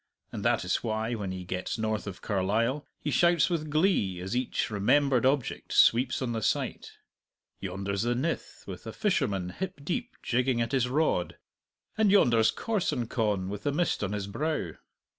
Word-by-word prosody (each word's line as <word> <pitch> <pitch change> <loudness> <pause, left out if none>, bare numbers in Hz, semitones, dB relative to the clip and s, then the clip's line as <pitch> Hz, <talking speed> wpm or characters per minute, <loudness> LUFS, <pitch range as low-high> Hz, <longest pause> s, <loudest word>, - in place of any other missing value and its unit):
And - - -5
that - - +2
is 90 - +1
why, 110 0 -2
when 100 -5 -3
he 95 -1 -5
gets 90 +1 -3
north 110 -1 -2
of 95 -2 -7
Carlisle, 110 +8 0
he 150 - -3
shouts 170 +5 +4
with 155 -3 -1
glee 150 - +2
as 95 +6 -4
each 125 -2 -1
remembered 130 +5 +3
object 135 -2 -1
sweeps 125 +3 +4
on 120 - -2
the 115 -1 -2
sight: - - -1 0.7
yonder's 100 +1 -3
the 120 +1 +1
Nith 155 +7 -3
with - - -8
a - - -5
fisherman 135 - 0
hip 180 - -5
deep 235 - -3
jigging 125 0 +1
at 115 +1 -1
his 130 -3 +1
rod, 135 - 0 0.6
and 215 -2 +5
yonder's 120 - +5
Corsoncon 115 - -1
with 100 +1 -5
the 145 - 0
mist 160 -5 0
on 100 +1 -2
his 100 -2 -2
brow. 120 - -2
120 Hz, 170 wpm, -28 LUFS, 100-145 Hz, 0.7 s, and